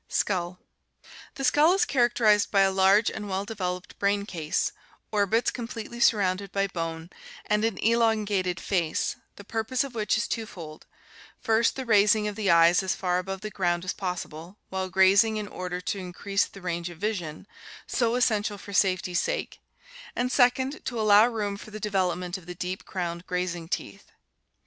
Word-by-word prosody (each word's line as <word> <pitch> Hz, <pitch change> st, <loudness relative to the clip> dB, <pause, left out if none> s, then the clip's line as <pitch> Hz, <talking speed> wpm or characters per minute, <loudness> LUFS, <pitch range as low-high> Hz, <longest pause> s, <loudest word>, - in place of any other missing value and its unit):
Skull. 180 Hz, -2 st, -1 dB, 0.4 s
— -, -, -18 dB
The 270 Hz, -, -5 dB
skull 300 Hz, +6 st, +5 dB
is 405 Hz, +3 st, +2 dB
characterized 240 Hz, -, +3 dB
by 195 Hz, -, +3 dB
a 195 Hz, 0 st, +4 dB
large 195 Hz, +3 st, +4 dB
and 210 Hz, -2 st, -6 dB
well 190 Hz, +1 st, -2 dB
developed 185 Hz, -3 st, -5 dB
brain 200 Hz, 0 st, +1 dB
case, 160 Hz, -6 st, -2 dB, 0.4 s
orbits 210 Hz, +3 st, +2 dB
completely 235 Hz, -1 st, -7 dB
surrounded 200 Hz, -3 st, +2 dB
by 195 Hz, 0 st, +1 dB
bone, 165 Hz, -3 st, -5 dB, 0.3 s
and 210 Hz, 0 st, +1 dB
an 225 Hz, -3 st, 0 dB
elon 225 Hz, -2 st, +3 dB
gated 185 Hz, -3 st, -1 dB
face, 170 Hz, -5 st, -1 dB, 0.2 s
the 205 Hz, -, -11 dB
purpose 225 Hz, +5 st, -1 dB
of 275 Hz, -2 st, -7 dB
which 215 Hz, -2 st, 0 dB
is 235 Hz, -, -1 dB
twofold, 175 Hz, -9 st, -6 dB, 0.5 s
first 225 Hz, +1 st, +2 dB
the 265 Hz, -, -5 dB
raising 210 Hz, -1 st, +4 dB
of 210 Hz, -, -4 dB
the 205 Hz, -2 st, -1 dB
eyes 170 Hz, +1 st, +6 dB
as 190 Hz, -1 st, -1 dB
far 180 Hz, -1 st, 0 dB
above 190 Hz, +1 st, -5 dB
the 215 Hz, -, -5 dB
ground 175 Hz, -2 st, -1 dB
as 185 Hz, -, -2 dB
possible 180 Hz, -1 st, -6 dB
while 190 Hz, 0 st, -3 dB
grazing 195 Hz, +4 st, +4 dB
in 210 Hz, -1 st, -4 dB
order 180 Hz, -2 st, -5 dB
to 190 Hz, +2 st, -3 dB
increase 195 Hz, +2 st, -1 dB
the 195 Hz, -, -13 dB
range 175 Hz, -1 st, -3 dB
of 175 Hz, -, -11 dB
vision, 180 Hz, -6 st, -4 dB, 0.4 s
so 235 Hz, -1 st, 0 dB
essential 215 Hz, -4 st, +1 dB
for 200 Hz, +1 st, -10 dB
safety's 185 Hz, -2 st, +2 dB
sake, -, -, -3 dB, 0.5 s
and 250 Hz, +1 st, -1 dB
second 260 Hz, +3 st, +2 dB
to 240 Hz, -3 st, -4 dB
allow 215 Hz, +1 st, +6 dB
room 210 Hz, -4 st, -3 dB
for 210 Hz, -, -11 dB
the 215 Hz, 0 st, -8 dB
development 185 Hz, -3 st, -1 dB
of 175 Hz, -, -19 dB
the 180 Hz, -, -7 dB
deep 180 Hz, +2 st, -5 dB
crowned 170 Hz, -2 st, -4 dB
grazing 175 Hz, -2 st, -3 dB
teeth. -, -, -5 dB
200 Hz, 175 wpm, -27 LUFS, 180-220 Hz, 0.5 s, eyes